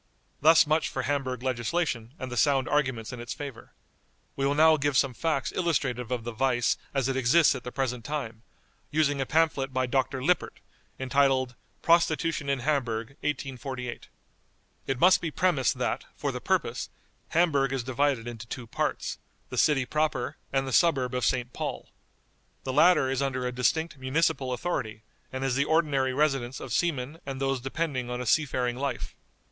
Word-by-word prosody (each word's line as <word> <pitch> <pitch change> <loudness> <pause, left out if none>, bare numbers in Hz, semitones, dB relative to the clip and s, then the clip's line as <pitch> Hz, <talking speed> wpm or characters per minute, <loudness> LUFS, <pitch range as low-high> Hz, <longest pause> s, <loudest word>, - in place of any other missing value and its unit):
Thus 160 +3 +7
much 155 +1 +1
for 135 - -3
Hamburg 130 -3 -2
legislation, 125 0 -1
and 130 -1 -6
the - - -4
sound 135 -1 +3
arguments 130 -5 0
in 125 - -7
its 120 - -5
favor. 140 -6 -8 0.6
We 135 0 0
will 140 - +1
now 160 +1 +6
give 145 -2 +1
some 135 -2 +2
facts 150 0 -1
illustrative 135 -9 -1
of 125 -2 -2
the 120 - -4
vice 120 0 +1 0.2
as 135 -3 0
it 135 - -1
exists 135 +6 +4
at 130 -3 -7
the 125 - -6
present 125 -3 -2
time, 115 -5 -4 0.5
using 145 -2 +1
a 135 - -2
pamphlet 150 -4 +1
by 130 0 0
Dr. 130 +1 -1
LIPPERT, 180 +3 0 0.4
entitled 130 -1 +2 0.3
"Prostitution 165 -3 +2
in 135 -2 0
Hamburg. 120 -5 -1
1848." 130 -3 -4 0.8
It 135 -2 -1
must 185 +4 +6
be 165 - -2
premised 150 -6 +1
that, - - -2
for - - -2
the - - -6
purpose, - - -1 0.4
Hamburg 145 -6 +2
is 135 -2 -1
divided 130 -1 0
into 120 -1 -7
two 125 0 -6
parts: - - -2 0.3
the - - -6
city 135 -4 +3
proper, 150 -4 -1 0.2
and 135 0 0
the 130 - -3
suburb 135 -8 +3
of 125 -4 +1
St. 125 -1 -1
Paul. - - -5 0.7
The 130 - -3
latter 150 -3 +5
is 135 0 -1
under 130 -2 -1
a 125 - -1
distinct 145 +5 0
municipal 135 0 0
authority, 115 -7 -3 0.3
and 130 0 -4
is 135 -2 +1
the 140 +1 +2
ordinary 150 -5 +2
residence 135 -2 0
of - - -6
seamen 155 -3 -1
and 135 -1 -5
those 135 -1 0
depending 135 -2 -2
on 125 0 -3
a 125 - -4
seafaring 125 -2 +1
life. 140 +1 -3
135 Hz, 175 wpm, -27 LUFS, 125-150 Hz, 0.8 s, Thus